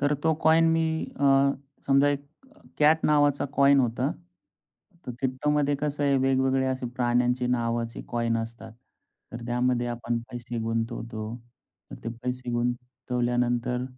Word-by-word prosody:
तर 145 +1 +2
तो 160 +2 +1
कॉइन 165 +1 +5
मी 165 0 +2 0.4
अ, 140 0 +4 0.3
समजा 140 +1 +4
एक 140 0 -2 0.3
अ, - - -22 0.2
कॅट 155 +2 +4
नावाचा 145 -1 +3
कॉइन 140 0 +6
होता. 125 +3 0 1.0
तर 125 - -4
क्रिप्टोमध्ये 145 +2 +1
कसं 145 -1 -2
आहे, 140 -1 +3
वेगवेगळे 130 0 +2
असे 130 -1 -2
प्राण्यांचे 125 0 +1
नावाचे 115 -1 -1
कॉइन 115 -1 0
असतात. 115 -1 -7 0.6
तर 120 0 -7
त्यामध्ये 120 0 0
आपण 120 0 -2
पैसे 120 -1 -5
गुंतवतो. 115 -1 -3 0.6
तर - - -8
ते - - -2
पैसे 125 0 -3
गुंतवल्यानंतर 125 0 -1
125 Hz, 135 wpm, -26 LUFS, 120-140 Hz, 1.0 s, कॉइन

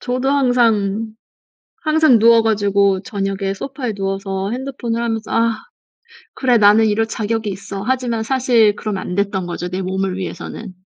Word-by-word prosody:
저도 255 +1 -2
항상, 225 -5 +1 0.7
항상 310 -5 +4
누워 230 +1 +6
가지고 200 -3 +2
저녁에 195 -3 -3
소파에 255 +1 -5
누워서 195 0 -3
핸드폰을 245 -2 -3
하면서 225 -2 -3
'아. 230 -1 +1 0.8
그래 250 -3 +2
나는 210 +2 +5
이럴 220 +1 +1
자격이 220 0 -2
있어.' 195 0 -6
하지만 245 -2 -1
사실 235 -4 +3
그러면 205 -3 -4
안 180 - -5
됐던 195 -2 -1
거죠 175 0 -4
내 185 +1 -4
몸을 190 0 -2
위해서는. 190 +1 -7
220 Hz, 325 characters per minute, -18 LUFS, 195-235 Hz, 0.8 s, 누워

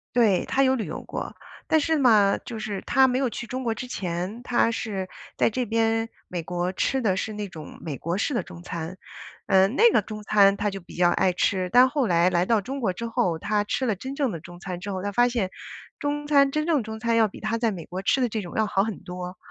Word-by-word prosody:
对， 220 -7 +4
他 270 - +2
有 265 -1 +3
旅 225 - -3
游 - - -6
过。 - - -6 0.3
但 315 - +3
是 320 +1 +1
嘛， 215 -7 +5
就 235 - -8
是 205 -3 -4
他 265 0 +5
没 250 0 +1
有 265 -2 +1
去 235 0 -6
中 255 0 -4
国 225 -1 0
之 250 +1 -7
前， 185 +1 -4
他 240 -1 +2
是 200 -4 -3 0.3
在 - - +3
这 250 +2 -2
边 225 0 +1 0.2
美 180 - -3
国 175 +2 -2
吃 265 +7 0
的 190 -4 +2
是 215 +3 -3
那 210 -1 -5
种 160 -5 -10
美 150 -5 -5
国 170 +2 -2
式 220 - 0
的 240 - +1
中 170 - -11
餐， 170 0 -5 0.5
呃， 190 0 +5
那 295 - +5
个 - - +4
中 215 +1 -8
餐 200 -1 +4
他 205 0 -1
就 195 - -6
比 175 - -14
较 175 0 +4
爱 190 -1 +2
吃， 185 +1 0
但 250 +2 +7
后 280 -3 0
来 175 0 +3
来 175 0 +1
到 225 -1 +3
中 270 +7 -5
国 200 -7 +1
之 230 +6 -5
后， 175 -7 0
他 210 -1 0
吃 260 +5 -1
了 215 -4 0
真 265 +8 -6
正 275 -3 0
的 170 - -5
中 175 +2 -12
餐 185 -2 -5
之 200 +3 -5
后， 185 0 -4
他 205 - -2
发 240 +4 +3
现 230 -7 -1 0.5
中 290 0 -3
餐 280 -2 +4
真 305 0 0
正 310 -7 +1
中 220 0 -7
餐 230 0 +1
要 225 -1 +5
比 200 - -10
他 220 +2 -1
在 230 -1 +1
美 175 -4 -7
国 180 +4 -6
吃 265 - +2
的 250 - +2
这 220 -1 -3
种 175 -4 -8
要 220 - +2
好 195 -1 +1
很 220 -2 -5
多， 180 0 -7
215 Hz, 275 characters per minute, -25 LUFS, 185-245 Hz, 0.5 s, 但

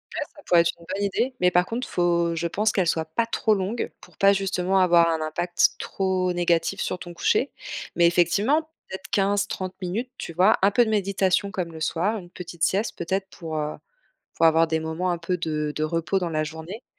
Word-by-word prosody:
Ouais, - - -2
ça 295 - -14
pourrait 175 -1 +5
être 170 - +1
une 170 - -15
bonne 200 +1 -2
idée. 240 +6 -1
Mais, 180 0 +4
par 180 0 +3
contre, 235 +5 -4
faut, 170 -1 +1
je 170 +1 -1
pense, 210 +5 +1
qu'elle 190 -4 +1
soit 160 0 0
pas 195 +9 -1
trop 225 -1 +1
longue 205 +4 -2
pour - - -18
pas 195 0 +5
justement 190 -1 0
avoir 170 -2 +5
un 160 -1 -1
impact 175 +3 +1
trop 185 -1 -1
négatif 170 -1 +1
sur - - -2
ton 175 0 -9
coucher. 255 +9 +1 0.4
Mais, 170 -1 +5
effectivement, 195 - +3 0.3
peut-être 190 +1 -8
15-30 195 -2 0
minutes. 205 +8 -3
Tu - - -6
vois? 185 +6 +4
Un 195 +2 +4
peu 240 +4 +4
de - - -2
méditation 200 -1 +1
comme 180 -5 -3
le 160 - -9
soir, 185 +8 0
une 175 -4 -10
petite 170 -2 -7
sieste 205 +4 +1
peut-être 190 +3 -2
pour, 160 -2 -6
heu, 150 0 -2 0.6
pour 165 - +3
avoir 165 0 +5
des 160 0 0
moments 160 +3 -2
un 175 - -1
peu 170 +2 -2
de 155 -3 -2
de 155 - -1
repos 165 +4 0
dans 175 -2 -2
la 155 -1 0
journée 160 +8 -8
180 Hz, 215 wpm, -24 LUFS, 165-195 Hz, 0.6 s, pourrait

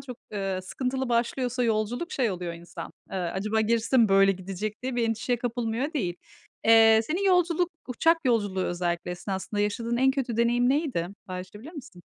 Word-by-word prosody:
çok, 250 -3 -8 0.2
eee, 195 -2 -2
sıkıntılı 260 +6 -3
başlıyorsa 245 +1 0
yolculuk, 230 - -1
şey 245 -6 +1
oluyor 180 -2 -4
insan, 170 +1 -9 0.2
eee, - - -4
"Acaba 190 +5 -1
gerisi 230 +2 0
de 260 - +6
mi 230 -3 +5
böyle 195 0 +5
gidecek?" 195 +4 -5
diye 255 -1 -3
bir 230 -1 +1
endişeye 240 +2 0
kapılmıyor 240 +3 -2
değil. 185 - -1 0.5
Eee, 225 0 +7
senin 340 - -2
yolculuk, 360 -2 +3 0.2
uçak 325 +7 +3
yolculuğu 205 -6 +1
özellikle 175 0 -2
esnasında 190 +3 -3
yaşadığın 230 +3 -1
en 265 +2 +4
kötü 265 -4 -2
deneyim 240 +1 +3
neydi? 270 - 0 0.2
Paylaşabilir 185 - -8
misin? 270 - -11
230 Hz, 170 wpm, -27 LUFS, 195-255 Hz, 0.5 s, Eee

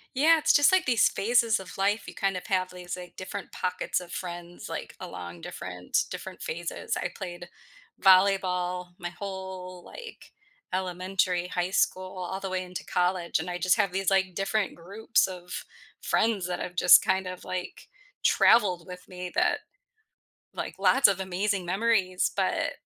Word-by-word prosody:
Yeah. 320 +5 +5
It's 310 - +3
just 290 +5 +5
like 375 - +3
these 235 -3 +4
phases 230 -1 +2
of 190 - -10
life. 200 +3 +1
You - - -8
kind 195 -2 0
of 180 - -6
have 185 -1 0
these, 180 0 -6
like, 180 -1 -10
different 190 +1 -7
pockets 180 0 -1
of 180 -1 -11
friends, 175 -1 -6
like, - - -6
along 85 -1 -8
different 90 -1 -2
different - - -7
phases. 170 +1 -3
I 175 - -1
played 175 -2 -7 0.5
volleyball 185 -2 +3
my 175 -1 -5
whole, 190 -2 -7
like, 470 -2 -11 0.4
elementary, 185 -1 -1
high 180 0 -1
school, 185 -1 0
all 190 0 -4
the 195 -1 -4
way 185 0 -1
into 180 0 -7
college. 180 -1 0
And 160 +3 -5
I 175 - -3
just 185 0 +3
have 200 -5 +1
these, 195 0 0
like, 190 -2 +2
different 195 +2 -1
groups 200 +7 0
of 180 -1 -7 0.4
friends 215 -5 +1
that 180 - -3
have 180 - -5
just 180 +1 +8
kind 190 0 +1
of, 185 0 -8
like, 185 -1 -6 0.4
traveled 185 -7 +4
with 180 0 -9
me 180 -1 -6
that - - +2 1.0
like, - - -4
lots 270 -5 +5
of 195 - +1
amazing 190 +1 -1
memories. 190 -1 +1
But, - - 0
185 Hz, 165 wpm, -27 LUFS, 180-195 Hz, 1.0 s, just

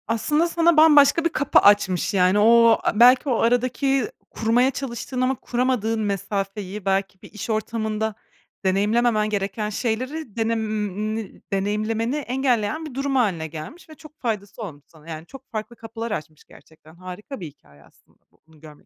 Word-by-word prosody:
Aslında 295 +9 +1
sana 335 -1 +2
bambaşka 310 +1 +6
bir - - +3
kapı 285 -4 +3
açmış. 200 -3 +3
Yani 185 +1 +3
o, 230 +1 +6
belki 250 +5 +5
o 240 - +2
aradaki 250 +2 +1 0.2
kurmaya 240 +4 +2
çalıştığın 255 -1 -5
ama 255 +1 +1
kuramadığın 240 -3 -1
mesafeyi, 200 0 -3
belki 195 0 -1
bir - - -14
iş 210 +2 -7
ortamında 220 0 -2 0.5
deneyimlememen 215 +3 +2
gereken 205 +1 -2
şeyleri 245 +4 -3
denemim 215 -2 -3
deneyimlemeni 215 +5 -1
engelleyen 265 +1 -1
bir 300 - -8
durum 275 +1 -2
hâline 190 -11 +1
gelmiş 165 - -10
ve - - -11 0.3
faydası 215 -2 -4
olmuş 150 -9 -8
sana. 160 0 -17
Yani 160 0 -7
çok 270 +6 -14
farklı 220 +1 -5
kapılar 225 0 -7
açmış 155 -5 -6
gerçekten. 160 0 -19
Harika 185 +9 -9
bir 175 - -6
hikâye 75 - -19
aslında - - -27
bu - - -33
bunu 160 -1 -21
görmek 150 -1 -15
220 Hz, 150 wpm, -23 LUFS, 195-250 Hz, 0.5 s, bambaşka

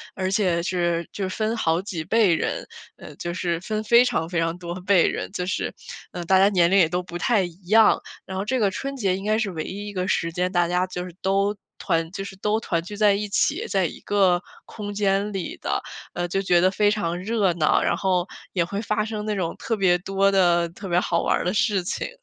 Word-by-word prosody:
而 190 0 -2
且 185 -4 +1
是 175 -2 -1
就 195 -2 -3
分 215 +4 -1
好 165 -4 +1
几 185 -5 -5
辈 195 0 +3
人， - - -3 0.3
呃， - - -11
就 175 - -4
是 170 -2 -1
分 215 +4 -3
非 235 +3 +6
常 165 -9 -1
非 175 -1 -1
常 165 +1 -1
多 175 -1 -6
辈 190 -1 +4
人， - - -3
就 180 -2 -3
是， 185 - -2 0.4
呃， 175 - -5
大 190 +2 +4
家 195 +1 +6
年 175 -4 +3
龄 195 - +5
也 175 -4 +6
都 180 +1 -1
不 175 -1 -7
太 235 +1 +2
一 175 +1 -9
样。 220 +2 +5 0.2
然 190 - -6
后 195 - -2
这 255 +4 0
个 205 -3 +2
春 275 +8 -4
节 195 -8 0
应 195 - -7
该 215 +1 +2
是 220 -3 -1
唯 160 -3 -4
一 205 +4 -6
一 205 - -7
个 185 -1 -2
时 170 -2 0
间， 180 +2 -1
大 175 -2 +2
家 180 +1 +1
就 180 -1 -5
是 180 - -10
都 195 +2 +1 0.2
团 165 -3 -1
就 195 - -5
是 195 0 -8
都 210 +3 0
团 170 -6 -1
聚 205 +4 -8
在 210 -1 +5
一 205 +1 -2
起， - - +1
在 190 -3 +1
一 - - -5
个 190 -3 +2 0.2
空 205 -2 -7
间 200 0 0
里 190 -3 -4
的， - - -1 0.3
呃， 175 0 -2
就 195 +3 -1
觉 175 -3 +3
得 185 +1 +4
非 205 +1 +3
常 175 -5 -1
热 205 -2 +1
闹， 160 -2 +2
然 - - +1
后 185 -2 +1 0.3
也 175 -3 +2
会 200 +4 -4
发 215 -1 0
生 215 -1 -4
那 215 -1 -1
种 175 -4 -2
特 230 - -2
别 185 -4 +3
多 195 +2 +1
的 175 -3 +3
特 195 +4 -9
别 175 -1 +2
好 170 -2 0
玩 - - +1
儿 - - -3
的 180 - 0
事 200 -2 +1
情。 175 - -3
190 Hz, 260 characters per minute, -24 LUFS, 175-205 Hz, 0.4 s, 非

